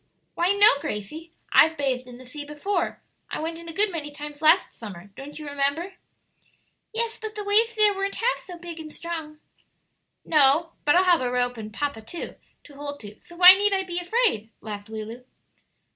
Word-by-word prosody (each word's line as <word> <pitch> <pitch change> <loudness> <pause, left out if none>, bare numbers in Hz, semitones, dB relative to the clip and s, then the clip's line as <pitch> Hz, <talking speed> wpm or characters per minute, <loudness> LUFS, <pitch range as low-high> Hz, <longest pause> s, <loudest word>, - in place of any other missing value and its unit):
"Why 350 +3 +2
no, 410 +1 +7
Gracie; 295 +9 -6 0.2
I've 320 0 +6
bathed 260 -3 -1
in 245 -1 -11
the 255 - -13
sea 290 +4 -7
before; 300 +8 -3 0.3
I - - -4
went 330 +1 -4
in 335 0 -10
a - - -5
good 400 +4 +2
many 305 -4 -4
times 295 0 -9
last 320 +4 +4
summer; 200 -3 -10
don't 280 +2 -9
you 305 - -8
remember?" 285 +6 -1 1.0
"Yes; 455 0 -2
but 435 -1 -6
the 420 - -4
waves 445 +3 +3
there 425 -1 +4
weren't 390 0 -3
half 485 +2 0
so 355 -2 -10
big 340 -1 -8
and 310 -1 -8
strong." 320 -3 -6 0.9
"No; 305 +2 +4
but 295 - +4
I'll 365 - +6
have 355 -4 +4
a 250 - 0
rope 245 0 0
and 215 -1 -7
papa, 285 -1 -3
too, 280 +10 -6 0.3
to 290 - -15
hold 285 0 -7
to; 210 -1 -11
so 345 - -15
why 360 +1 +10
need 405 +1 +2
I 385 -1 +1
be 355 -1 -3
afraid?" 355 - +1
laughed 210 -1 -8
Lulu. 220 +3 -7
315 Hz, 195 wpm, -25 LUFS, 265-370 Hz, 1.0 s, why